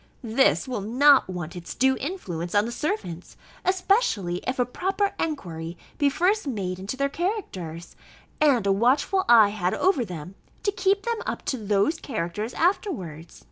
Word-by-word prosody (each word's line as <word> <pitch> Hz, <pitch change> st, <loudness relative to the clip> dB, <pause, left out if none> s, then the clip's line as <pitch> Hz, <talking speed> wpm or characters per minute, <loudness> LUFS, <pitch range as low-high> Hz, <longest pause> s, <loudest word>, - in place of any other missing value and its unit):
This 240 Hz, +4 st, +2 dB
will 245 Hz, -5 st, -3 dB
not 260 Hz, +4 st, +5 dB
want 175 Hz, -3 st, -5 dB
its 175 Hz, -1 st, -7 dB
due 265 Hz, +1 st, +3 dB
influence 185 Hz, -, -4 dB
on 205 Hz, +1 st, +4 dB
the 235 Hz, -, -4 dB
servants; 240 Hz, -, -4 dB, 0.3 s
especially 370 Hz, -, +1 dB
if 255 Hz, -, -1 dB
a 250 Hz, -, +2 dB
proper 385 Hz, +10 st, -1 dB
enquiry 170 Hz, -, -4 dB, 0.2 s
be 285 Hz, -1 st, +4 dB
first 365 Hz, +5 st, +1 dB
made 190 Hz, -7 st, -3 dB
into 200 Hz, +7 st, -5 dB
their 280 Hz, +1 st, +1 dB
characters, 235 Hz, -, -4 dB, 0.5 s
and 265 Hz, -8 st, +4 dB
a 200 Hz, -, +3 dB
watchful 265 Hz, -, +2 dB
eye 220 Hz, -4 st, +8 dB
had 190 Hz, -3 st, -1 dB
over 365 Hz, -9 st, +2 dB
them, 180 Hz, -3 st, -7 dB, 0.3 s
to 405 Hz, -, +2 dB
keep 390 Hz, +1 st, +1 dB
them 465 Hz, 0 st, -2 dB
up -, -, -4 dB
to 260 Hz, -, -1 dB
those 205 Hz, +10 st, +1 dB
characters 215 Hz, -1 st, -4 dB
afterwards. 190 Hz, -, -2 dB
245 Hz, 160 wpm, -25 LUFS, -, 0.5 s, eye